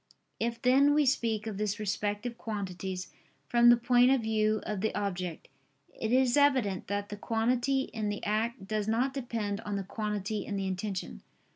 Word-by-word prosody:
If 230 0 -1
then 275 +3 +5
we 300 -1 +4
speak 225 -4 +1
of 210 -3 -5
these 210 -1 -1
respective 210 +3 -2
quantities 190 -4 -5 0.4
from 240 -1 +5
the 240 - +7
point 245 +1 +4
of 265 -2 +3
view 215 -1 +1
of 210 -3 -3
the 220 - -1
object, 180 -5 -3 0.5
it 220 - -3
is 255 -1 +4
evident 260 -10 +2
that 205 +1 -2
the 205 - -6
quantity 240 +5 +1
in 220 -5 -3
the 205 - -4
act 220 +1 -1
does 215 0 -1
not 245 +5 +1
depend 225 -6 -3
on 205 -2 -4
the 200 - -2
quantity 210 0 -3
in 205 - -4
the 195 -1 -2
intention. 190 - -4
215 Hz, 175 wpm, -30 LUFS, 205-240 Hz, 0.5 s, the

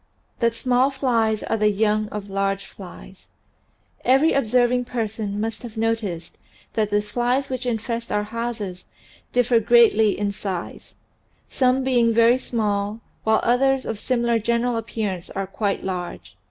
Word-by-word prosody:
J 235 - +3
THAT 230 - -14
SMALL 255 +2 +2
FLIES 230 -6 0
ARE 225 - -1
THE 210 0 +3
YOUNG 210 +1 +1
OF 210 -2 -6
LARGE 195 0 -1
FLIES 190 0 -13 0.8
VERY 270 +6 +4
observing 245 0 +2
person 220 -4 -3
must 225 +1 -3
have 235 -2 -9
noticed 220 -7 -2 0.3
that 215 -2 0
the 205 0 +1
flies 245 +5 -1
which 255 -1 -3
infest 230 0 -3
our 210 0 +1
houses 220 -4 -5 0.5
differ 245 -1 +3
greatly 225 -2 +4
in 205 0 -1
size, 190 -3 -6 0.5
some 260 0 +2
being 240 -3 +3
very 230 +2 +4
small 210 -3 -2 0.2
while 220 0 +3
others 265 +2 +2
of 220 - -4
simi 240 0 0
lar 235 -1 +2
general 235 +2 0
appearance 220 -5 -3
are 195 0 -3
quite 200 +1 -2
large. 175 - -5
225 Hz, 150 wpm, -23 LUFS, 205-245 Hz, 0.8 s, VERY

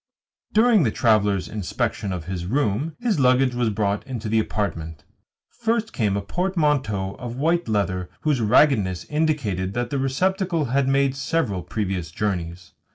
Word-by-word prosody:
During 220 -1 +5
the 125 - +3
traveller's 105 -4 +2
inspection 100 0 -2
of 90 -4 -4
his 90 -1 -4
room 135 - 0
his 235 -9 0
luggage 130 0 +4
was 120 -2 +1
brought 100 -1 -1
into 115 -5 -4
the 110 +1 +3
apartment. 80 -8 -3 0.5
First 230 -1 -1
came 105 -4 0
a 100 - -3
portmanteau 145 - 0
of 120 -2 -6
white 165 +4 +1
leather 95 -4 -1
whose 150 -5 +1
raggedness 105 -5 +3
indicated 115 - 0
that 120 0 -2
the 140 - 0
receptacle 175 +4 0
had 135 +2 +1
made 135 0 +2
several 135 - -1
previous 95 -5 -3
journeys. 90 -2 -3
115 Hz, 150 wpm, -23 LUFS, 100-150 Hz, 0.5 s, During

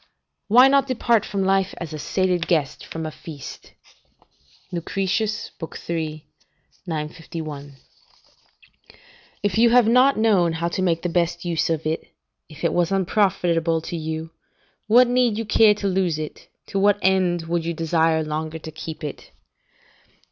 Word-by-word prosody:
["Why 245 +5 +7
not 275 0 +3
depart 235 -4 +1
from 200 -2 -1
life 195 0 +1
as 165 -3 -6
a 155 - -5
sated 180 +1 0
guest 155 -7 0
from 160 0 -5
a 155 - -4
feast? 150 -3 -10 1.0
"Lucretius, 195 +4 -2 0.4
iii. 155 -2 -3 0.6
951.] 155 -2 -6 1.7
"If 205 +1 +1
you 235 +1 +6
have 240 -1 +5
not 255 +4 +5
known 195 -7 +3
how 170 +1 -2
to 185 - -3
make 170 -3 0
the - - 0
best 170 0 -1
use 165 -3 0
of 160 -1 -1
it, 160 +1 -2 0.4
if 155 0 -12
it 170 - +1
was 175 0 +1
unprofitable 175 -4 +1
to 170 - -6
you, 160 0 -4 0.6
what 240 +3 +6
need 245 -3 +2
you 225 - -2
care 210 0 +5
to 205 - -6
lose 185 -4 0
it, 155 -1 -7 0.2
to 195 - -2
what 205 +1 +4
end 185 -3 +2
would 170 0 -1
you 170 0 -3
desire 160 0 +1
longer 155 +1 -4
to 160 0 -9
keep 160 +1 -8
it? 150 - -7
170 Hz, 150 wpm, -23 LUFS, 160-205 Hz, 1.7 s, Why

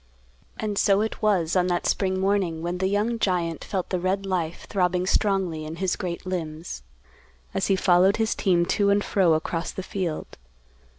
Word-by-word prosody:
And 210 -2 -1
so 200 0 +4
it 220 - -3
was, 190 -6 +2
on 180 -1 +3
that 175 -1 -1
spring 190 -1 +1
morning 190 -4 0
when 175 +1 -2
the 190 - +1
young 210 +4 0
giant 175 -5 0
felt 190 -3 -3
the 185 - 0
red 190 +2 -1
life 175 -4 -2
throbbing 180 -2 +1
strongly 190 -5 +1
in 155 +1 -6
his 185 +1 0
great 175 -3 -5
limbs, 165 -3 -4 0.7
as 195 -1 0
he 195 - +3
followed 185 +1 +4
his 225 0 +1
team 175 -3 +2
to 200 +2 +2
and 200 0 +3
fro 185 -5 +3
across 165 +2 -2
the 190 - -5
field. 180 -5 -4
185 Hz, 180 wpm, -25 LUFS, 175-200 Hz, 0.7 s, so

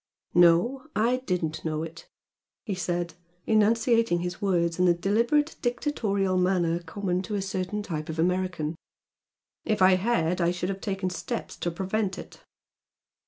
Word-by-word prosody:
"No 175 - +4
I 235 +4 +2
didn't 160 -4 -1
know 155 -1 -2
it" 165 0 -9 0.6
he 210 - -2
said, 175 -2 -2 0.3
enunciating 225 -3 +3
his 180 0 -4
words 170 -4 +1
in 180 - +4
the 175 -1 +5
deliberate 235 - +1
dictatorial 215 -7 0
manner 180 -2 +2
common 180 +2 -2
to 210 +2 -4
a 200 - -1
certain 190 +2 -3
type 155 -5 -4
of 160 - -4
American 175 -2 0 0.9
"If 215 -1 0
I 185 0 +6
had 180 -4 +1
I 170 - +3
should 180 +1 -2
have 195 0 -4
taken 195 -2 -2
steps 235 +6 -4
to 175 - -2
prevent 190 +3 -2
it." - - -11
185 Hz, 150 wpm, -27 LUFS, 175-210 Hz, 0.9 s, I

